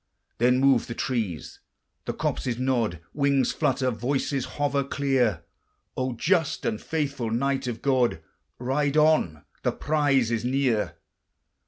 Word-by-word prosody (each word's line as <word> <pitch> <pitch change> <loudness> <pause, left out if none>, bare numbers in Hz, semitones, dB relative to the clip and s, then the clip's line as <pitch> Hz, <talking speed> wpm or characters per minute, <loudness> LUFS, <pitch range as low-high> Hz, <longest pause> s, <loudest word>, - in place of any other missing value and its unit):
Then 125 +2 +4
move 135 -3 +4
the 115 - -5
trees, 110 - -3 0.5
the - - -2
copses 120 -3 -2
nod, 120 -9 0
Wings 140 -2 +2
flutter, 130 -1 0
voices 130 +3 -1
hover 140 -1 +1
clear: 130 -10 0 0.5
"O 130 -1 -1
just 160 - +1
and 110 -1 -1
faithful 140 -7 -2
knight 135 +3 0
of 115 -2 -5
God! 130 - +2 0.4
Ride 140 +4 0
on! 150 - +3 0.2
the - - +1
prize 140 -6 +1
is 115 -1 -1
near." 125 -4 0
130 Hz, 130 wpm, -26 LUFS, 115-140 Hz, 0.5 s, Then